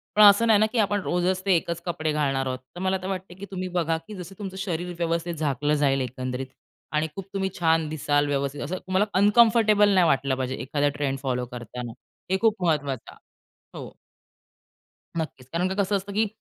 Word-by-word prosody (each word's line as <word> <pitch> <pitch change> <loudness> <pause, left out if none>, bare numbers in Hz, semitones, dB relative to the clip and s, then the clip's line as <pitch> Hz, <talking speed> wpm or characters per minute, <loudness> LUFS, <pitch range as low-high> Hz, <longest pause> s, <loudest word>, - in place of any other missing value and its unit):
पण 210 - +5
असं 205 +3 +7
नाही 215 -2 +6
ना, 215 - +5
की 245 - -3
आपण 205 -1 +2
रोजच 180 +1 0
ते 190 -2 +4
एकच 170 0 -2
कपडे 160 -3 -1
घालणार 135 -3 0
आहोत. 130 0 -2 0.2
तर - - -7
मला 190 0 +1
तर 185 - -5
वाटत, 190 -1 -5
की 200 - -6
तुम्ही 185 -1 -3
बघा 165 -1 +1
की 215 - -8
जसं 185 +1 -9
तुमचं 190 -2 -6
शरीर 180 -2 -3
व्यवस्थित 170 0 -1
झाकलं 150 -1 0
जाईल 135 -1 +3
एकंदरीत 130 +1 -4 0.4
आणि 155 +1 +1
खूप 195 - -6
तुम्ही 190 -1 -1
छान 165 -2 +3
दिसाल 145 -1 +1
व्यवस्थित 140 0 -2
असं, 180 +6 -3
तुम्हाला 185 +3 0
अनकंफर्टेबल 215 -1 +5
नाही 185 -3 +5
वाटलं 135 -2 +2
पाहिजे, 130 0 -2
एखादा 145 +2 0
ट्रेंड 135 -2 0
फॉलो 125 -2 -1
करताना, 120 0 -6 0.4
हे 190 - +3
खूप 215 -5 +2
महत्वाचं 140 -6 -1
आहे. - - -20 0.6
हो. - - -9 1.2
नक्कीच. 135 -5 -5
कारण 180 +2 +1
का 190 - -3
कसं 200 +2 0
असतं 200 +1 -3
की 215 +1 +2
170 Hz, 195 wpm, -25 LUFS, 140-190 Hz, 1.2 s, असं